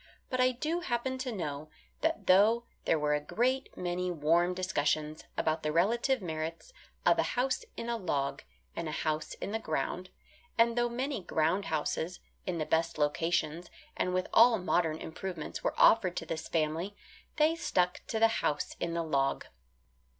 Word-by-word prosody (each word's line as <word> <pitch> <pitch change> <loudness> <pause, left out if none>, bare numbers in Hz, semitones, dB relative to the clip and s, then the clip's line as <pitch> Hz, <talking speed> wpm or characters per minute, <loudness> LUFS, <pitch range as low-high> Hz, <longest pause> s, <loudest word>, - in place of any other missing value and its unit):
But 255 0 +1
I 255 0 +5
do 310 +7 -1
happen 260 -4 -2
to 255 -1 -2
know 155 -7 -4 0.3
that 325 +1 0
though 210 +6 +5 0.2
there 165 - +3
were 150 -1 +1
a 150 - +1
great 255 - -1
many 180 0 -1
warm 170 +2 +2
discussions 155 -4 -1
about 155 0 +1
the 155 - -1
relative 230 - +2
merits 160 - -5 0.3
of - - +5
a - - 0
house 255 +1 +1
in 230 - -4
a 235 0 0
log, 140 -8 -1 0.3
and 165 -2 -3
a 150 - -3
house 155 -1 -1
in - - -5
the 225 - -1
ground, 175 +1 -2 0.5
and 230 0 +4
though 240 0 +2
many 260 0 -2
ground 170 +3 +1
houses 160 +2 -2 0.3
in 180 -2 -1
the 155 - -1
best 165 +1 +1
locations 165 +2 0 0.3
and 180 - 0
with 185 0 0
all 230 0 +7
modern 175 -4 +1
improvements 160 0 -6
were - - -1
offered 185 -6 +5
to - - -3
this 160 -1 -4
family, 165 +5 -1 0.4
they 310 +2 +3
stuck 180 - 0
to 225 - -2
the 225 +1 +6
house 150 - -1
in 170 -1 -2
the 170 - 0
log. 140 -3 0
180 Hz, 170 wpm, -31 LUFS, 155-230 Hz, 0.5 s, all